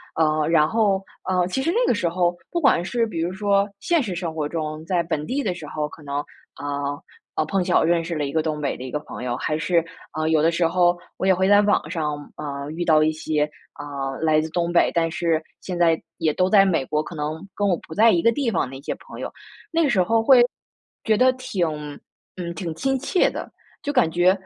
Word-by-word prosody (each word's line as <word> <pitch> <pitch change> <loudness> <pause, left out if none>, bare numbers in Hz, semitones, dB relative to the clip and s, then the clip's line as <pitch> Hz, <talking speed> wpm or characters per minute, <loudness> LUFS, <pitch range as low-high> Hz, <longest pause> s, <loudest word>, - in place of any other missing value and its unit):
呃， 155 -1 +2
然 155 -2 +4
后， 200 0 +2 0.3
呃， 180 -1 +2
其 225 +9 -2
实 330 - +1
那 - - +2
个 - - +4
时 180 - 0
候 175 0 +1 0.2
不 345 - 0
管 275 - +4
是 230 +5 0
比 170 -6 -5
如 170 +2 -1
说 200 +1 +1
现 340 -4 +1
实 200 -6 -3
生 170 -2 -3
活 150 -2 -1
中， 155 -1 -4
在 175 0 +1
本 160 -3 -2
地 275 - -1
的 190 - 0
时 175 -3 -9
候， 150 0 -3
可 160 - -13
能， 140 -1 -5 1.2
呃， - - +2
碰 195 +3 +1
巧 - - +3
我 - - +2
认 170 0 +3
识 165 0 -4
了 150 - -1
一 140 - -2
个 160 - +1
东 155 -1 -3
北 140 - -1
的 130 - -7
一 - - -6
个 150 - -2
朋 140 - -8
友， 120 -1 -1
还 155 +4 -1
是， 170 +1 +1 0.3
呃， 155 - 0
有 160 -1 +3
的 165 +2 +4
时 170 -1 +1
候 175 0 +3 0.2
我 190 - -1
也 190 - +5
会 190 +2 +2
在 205 - +7
网 205 0 +1
上， 150 -3 -1 0.2
呃， 140 -1 -5
遇 170 +2 -3
到 155 -2 +5
一 155 - +3
些， 155 -1 -1 0.3
呃， 140 -2 -5
来 155 -1 +3
自 160 +1 -2
东 170 0 0
北， 175 - +4
但 165 -1 +1
是 165 -2 0 0.2
现 180 -2 -5
在 165 -2 +3 0.2
也 155 - +1
都 185 +3 +1
在 200 -1 +7
美 165 -8 +1
国， 150 +3 -1
可 155 - -9
能 155 +3 -4
跟 205 - 0
我 185 - +3
不 - - -9
在 225 +6 +5
一 170 - +2
个 230 - +4
地 250 0 0
方 130 - 0
的 135 - -8
一 - - -12
些 - - -4
朋 - - -12
友。 - - -4 0.4
那 330 0 +2
个 295 - +2
时 205 -7 +3
候 225 +5 +2
会 255 0 +7 0.6
觉 215 -1 +2
得 255 +3 +5
挺 215 -9 -2 0.7
嗯， 170 -1 -4
挺 165 -2 -4
亲 270 +10 0
切 350 +7 +2
的， - - -7 0.3
就 290 - -1
感 250 - +3
觉， 175 +2 +4
170 Hz, 265 characters per minute, -23 LUFS, 155-195 Hz, 1.2 s, 在